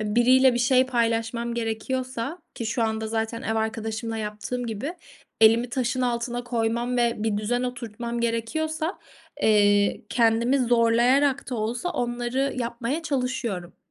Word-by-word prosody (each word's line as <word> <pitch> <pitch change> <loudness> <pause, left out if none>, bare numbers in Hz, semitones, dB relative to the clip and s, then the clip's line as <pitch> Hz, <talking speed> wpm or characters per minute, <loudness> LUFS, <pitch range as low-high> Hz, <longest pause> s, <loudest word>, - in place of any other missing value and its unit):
Biriyle 245 +4 +4
bir 240 - 0
şey 255 +1 +4
paylaşmam 235 -1 0
gerekiyorsa 235 +5 -3 0.2
ki 230 - -4
şu 230 +1 0
anda 220 0 -1
zaten 225 +1 -2
ev 220 -2 -1
arkadaşımla 220 +1 -2
yaptığım 215 +3 -4
gibi 235 - -4 0.5
elimi 225 +2 +5
taşın 255 0 -1
altına 240 0 -1
koymam 235 +1 -1
ve 235 -1 +2
bir 215 -2 +1
düzen 245 +4 -1
oturtmam 235 -1 -4
gerekiyorsa, 310 - -2 0.4
eee, 205 -1 +4
kendimi 235 +3 +3
zorlayarak 245 +4 +3
da - - -2
olsa 235 +7 -2
onları 245 -1 -1
yapmaya 240 +6 -2
çalışıyorum. 250 - -3
235 Hz, 130 wpm, -25 LUFS, 225-250 Hz, 0.5 s, elimi